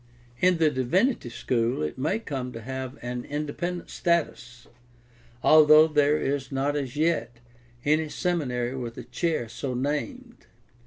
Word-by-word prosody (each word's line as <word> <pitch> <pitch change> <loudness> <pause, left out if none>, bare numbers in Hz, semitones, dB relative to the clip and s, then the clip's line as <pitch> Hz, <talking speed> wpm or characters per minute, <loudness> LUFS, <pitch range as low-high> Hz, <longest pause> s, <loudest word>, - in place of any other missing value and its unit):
In 180 -1 +4
the 160 -2 +3
divinity 140 - +1
school 120 -4 -1
it 75 - -3
may 155 +10 0
come 135 - -5
to 115 - -7
have 130 +2 -6
an 125 0 -4
independent 150 +4 -4
status, 125 -8 -1 0.8
although 155 0 +7
there 150 -1 +3
is 140 -2 -2
not 140 +2 0
as 140 -2 -3
yet 155 -6 0 0.5
any 155 +1 +2
seminary 135 -9 -1
with 120 -3 -6
a 125 - -6
chair 125 +2 -2
so 125 +3 -5
named. 235 - -4
145 Hz, 140 wpm, -26 LUFS, 125-160 Hz, 0.8 s, although